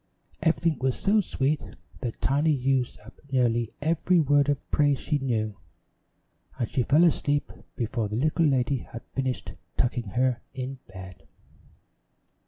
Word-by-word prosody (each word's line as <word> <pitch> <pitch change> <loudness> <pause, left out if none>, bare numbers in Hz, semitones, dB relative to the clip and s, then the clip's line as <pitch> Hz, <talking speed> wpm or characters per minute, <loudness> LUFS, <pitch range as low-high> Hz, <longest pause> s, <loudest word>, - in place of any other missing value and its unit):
Everything 165 -1 +2
was 130 0 0
so 210 +2 +3
sweet 150 -4 0 0.4
that 120 -3 -4
Tiny 145 +4 +2
used 135 -3 +1
up 115 - -15
nearly 120 -3 +2
every 170 +3 +3
word 145 -1 +3
of 145 -1 -1
praise 145 -2 +3
she 150 -2 0
knew, 110 -6 -1 1.0
and 120 - -1
she 130 - 0
fell 150 +7 +4
asleep 145 -3 +1 0.2
before 115 -2 -2
the 105 - -2
little 155 +4 +2
lady 135 0 +2
had 115 -1 -9
finished 130 -8 -3 0.2
tucking 120 -3 0
her 125 -1 +2
in 130 0 -5
bed. 95 -1 -11
130 Hz, 140 wpm, -27 LUFS, 120-145 Hz, 1.0 s, fell